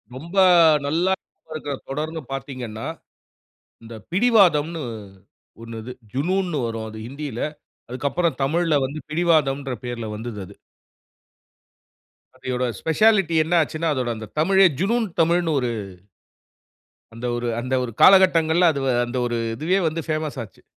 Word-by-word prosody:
ரொம்ப 170 +8 -9 0.5
நல்லா 170 +6 +1 0.4
இருக்கர 145 -2 -4
தொடர்ன்னு 155 +4 -4
பாத்தீங்கன்னா, 125 -5 -6 1.0
இந்த 115 0 -10 0.2
பிடிவாதம்ன்னு 175 -8 +3 0.8
ஒண்ணு 115 -1 -8
இது. 125 +3 -7 0.2
"ஜுநூ" 165 +9 0
ன்ன்னு 165 -4 -2
வரும். 115 -1 -4
அது 110 - -9
ஹிந்தில. 140 -2 -6 0.5
அதுக்கப்பறம் 145 +7 -1
தமிழ்ல 165 +3 +1
வந்து 145 +3 -7
"பிடிவாதம்"ன்ற 150 -5 +1
பேர்ல 115 -2 -4
வந்துது 115 -1 -6
அது. 100 - -14 1.8
அதோட 130 -1 -3 0.2
ஸ்பெஷாலிட்டி 190 0 +3
என்ன 165 +3 -3
ஆச்சுனா, 160 +1 -2
அதோட 125 -3 -2
அந்த 110 0 -8
தமிழே 190 +4 +5
ஜுனூன் 225 +4 +1
தமிழ்ன்னு 165 -1 +2
ஒரு 125 -2 -1 1.4
அந்த 115 +2 -7
ஒரு 120 0 -3
அந்த 130 +1 -4
ஒரு 120 - -4
காலகட்ங்கள்ல, 175 -3 +6
அது 140 - -3 0.2
அந்த 125 +2 -5
ஒரு 120 -1 -2 0.2
இதுவே 180 +9 +1
வந்து 160 +1 -2
ஃபேமஸ் 155 -3 -2
ஆச்சு. 105 - -16
150 Hz, 125 wpm, -22 LUFS, 125-170 Hz, 1.8 s, காலகட்ங்கள்ல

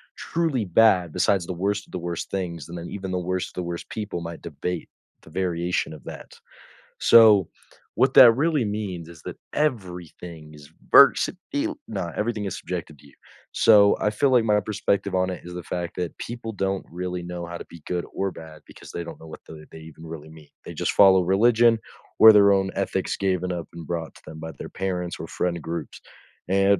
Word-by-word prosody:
truly 160 -9 -1
bad 90 -3 +4
besides 95 0 +1
the 90 - -3
worst 100 +3 -2
of - - -21
the 90 - -4
worst 85 0 -5
things, 85 -5 -4
and 85 - -7
then 85 - -7
even 95 -2 -6
the 90 - -1
worst 90 +1 -2
of - - -21
the 90 - -3
worst 85 0 -6
people 105 -5 -5
might 85 0 -7
debate 90 -2 -5 0.3
the - - -15
variation 90 -1 -1
of 75 - -12
that. - - -10 0.7
So, 105 -6 +6 0.5
what 130 0 +3
that 120 -3 +10
really 145 -2 +1
means 100 -5 -4
is 85 -3 -13
that - - -8 0.2
everything 90 - -4
is 75 -1 -14 0.2
versatile 285 - +4
no, 90 -5 -4
everything 110 -1 -2
is 95 -1 -4
subjected 80 -5 -6
to 70 - -18
you. 70 - -20 0.4
So, 100 -2 +6
I 105 - +2
feel 130 +6 +1
like 120 -3 +4
my 105 -1 +3
perspective 100 -1 -1
on 95 0 +1
it 90 - -6
is 90 - -8
the 90 -1 -6
fact 85 0 -5
that 90 -1 -4
people 120 -1 -6
don't 95 -1 -2
really 90 0 -4
know 85 -1 -6
how 85 0 -7
to - - -8
be 85 - -13
good 90 -1 -2
or 95 -1 -2
bad 80 -2 -12
because - - -13
they 85 - -5
don't 85 - -9
know 80 - -13
what - - -10
the 75 -1 -11
they - - -11
even 80 +1 -13
really 80 -1 -9
mean. 80 -2 -15 0.2
They - - -8
just - - -1
follow 95 -2 +6
religion 115 +5 +4 0.4
or 110 -1 +10
their 100 -1 +6
own 95 -1 +2
ethics 95 -1 -1
given 90 -2 -1
up 85 -2 -5
and 85 -2 -9
brought 85 -2 -4
to - - -17
them 80 0 -9
by 80 0 -6
their - - -7
parents 90 -2 -3
or 80 - -6
friend 85 -2 -2
groups, 80 -1 -6 0.5
and 100 +1 +3
90 Hz, 210 wpm, -24 LUFS, 85-105 Hz, 0.7 s, that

